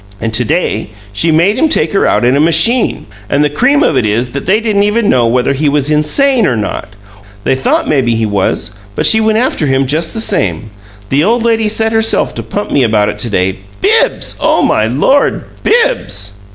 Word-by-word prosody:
And 115 0 -3
to 125 - +1
day 145 -7 -2 0.2
she 160 +11 0
made 180 +9 +2
him 320 +2 +2
take 165 - 0
her 195 - +2
out - - +1
in 125 +2 +2
a - - +1
machine! 220 - +2 0.2
And 140 +1 +1
the 150 - 0
cream 275 - +2
of 160 - +1
it 130 - +1
is 115 +4 -1
that 140 +4 -6
they 200 +4 +3
didn't 215 -3 0
even 210 +2 +1
know 120 -2 +2
whether 125 +3 +1
he 145 +2 0
was 145 0 0
INSANE 235 - +2
or 125 - 0
not 105 -1 -5 0.5
they - - +1
thought 130 0 0
maybe 125 -6 +1
he 110 0 0
was, 100 +1 -2 0.2
but - - -1
she 220 - +4
went 220 0 +1
after 230 - 0
him 135 0 +1
just 160 +4 -2
the - - -2
same! 100 - -2 0.4
The 140 +3 +1
old 230 +4 +1
lady 225 -2 +1
set 220 +1 0
herself 225 0 +1
to - - -5
pump 205 - -5
me 140 - +2
about 110 -4 +1
it 105 - -6
to 115 - -3
day. 95 -2 -1 0.2
BIBBS! - - +1
Oh, - - +1
my 110 - +1
Lord! 150 - +1 0.2
BIBBS!" 100 - -1
150 Hz, 215 wpm, -12 LUFS, -, 0.5 s, she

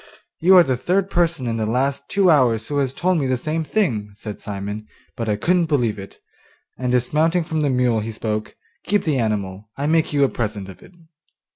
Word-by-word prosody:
'You 185 +3 +6
are 175 - +9
the 130 -5 -1
third 190 +8 0
person 170 -6 +1
in 115 -1 -1
the 110 -1 -1
last 135 +4 -1
two 195 -3 +4
hours 120 -7 +3
who 145 - -2
has 135 -2 0
told 180 +4 0
me 135 - 0
the 130 0 +1
same 155 +5 -2
thing,' 120 - -1
said 105 0 -7
Simon, 105 +1 -5 0.3
'but 115 -3 -3
I 105 - +2
couldn't 170 - +1
believe 120 -9 0
it,' 95 - -10 0.6
and 125 -1 -2
dismounting 155 +8 +2
from 160 0 -2
the 145 - +1
mule 125 -3 +2
he 110 +2 -4
spoke: 110 -1 -4 0.3
'Keep 205 0 +1
the 150 -5 0
animal, 105 -2 -2
I 140 - -2
make 160 +1 +2
you 145 -1 +2
a - - +5
present 105 -4 -4
of 95 - -12
it. - - -16
130 Hz, 215 wpm, -21 LUFS, 110-160 Hz, 0.6 s, are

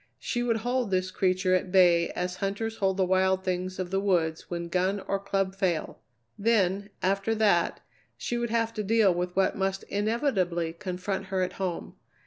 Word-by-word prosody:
She 240 - -2
would 235 -2 +1
hold 245 -2 0
this 185 -1 0
creature 185 0 +1
at 185 0 0
bay 175 -3 +5
as 180 +1 -3
hunters 220 +3 -3
hold 190 -1 +1
the 190 - +3
wild 190 0 +2
things 185 0 -2
of 185 -1 -4
the 195 - +1
woods 170 -5 0
when 170 -1 -3
gun 185 +3 0
or 195 +1 -2
club 195 -1 -1
fail. 185 -4 -1 0.4
Then, 200 -2 +2
after 195 +4 +1
that, 205 -6 +2 0.4
she 240 - -3
would 235 0 -1
have 230 0 0
to 215 - -3
deal 210 -2 +4
with 180 +1 -3
what 195 - +2
must 195 0 -1
inevitably 200 - 0
confront 185 +1 -4
her 190 0 -1
at 180 0 -3
home. 180 -3 -4
190 Hz, 180 wpm, -28 LUFS, 180-205 Hz, 0.4 s, bay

